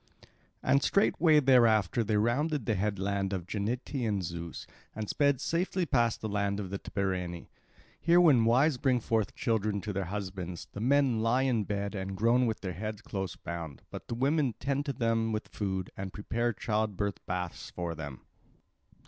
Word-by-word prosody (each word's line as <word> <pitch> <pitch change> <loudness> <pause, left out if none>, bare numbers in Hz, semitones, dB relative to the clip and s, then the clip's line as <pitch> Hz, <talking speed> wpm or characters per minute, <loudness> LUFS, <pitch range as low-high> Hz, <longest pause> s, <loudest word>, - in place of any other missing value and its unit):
And 140 - +4
straightway 165 -5 +4
thereafter 115 -6 +4
they 105 0 +1
rounded 130 +5 +1
the 110 - +1
headland 100 -1 -1
of 90 -3 -3
Genetaean 110 0 -2
Zeus 85 -1 -6 0.3
and 110 -1 -4
sped 140 +1 +2
safely 175 +4 0
past 120 -6 +1
the 110 - -2
land 100 -1 -1
of 95 -3 -5
the 100 - -3
Tibareni. 90 -3 -3 0.5
Here 170 +1 +5
when 140 -10 +6
wives 130 +4 +3
bring 130 -2 +2
forth 110 -2 0
children 110 -4 0
to 105 +2 -4
their 95 0 -2
husbands, 95 -2 -5
the 100 - -5
men 130 -1 +3
lie 115 +4 +2
in 120 -6 +1
bed 100 0 -2
and 95 -1 -4
groan 120 +4 +3
with 110 - -2
their 95 -2 -3
heads 105 +4 -5
close 95 -3 -4
bound; 85 -4 -7
but - - -8
the 115 - -3
women 135 -1 +1
tend 140 +2 -1
them 115 -5 0
with 110 - -3
food, 95 -3 -3
and 95 -1 -5
prepare 120 +4 -1
child 105 -2 -1
birth 100 -1 -2
baths 90 -1 -4
for 85 -1 -4
them. 75 -5 -7
110 Hz, 170 wpm, -30 LUFS, 95-125 Hz, 0.5 s, when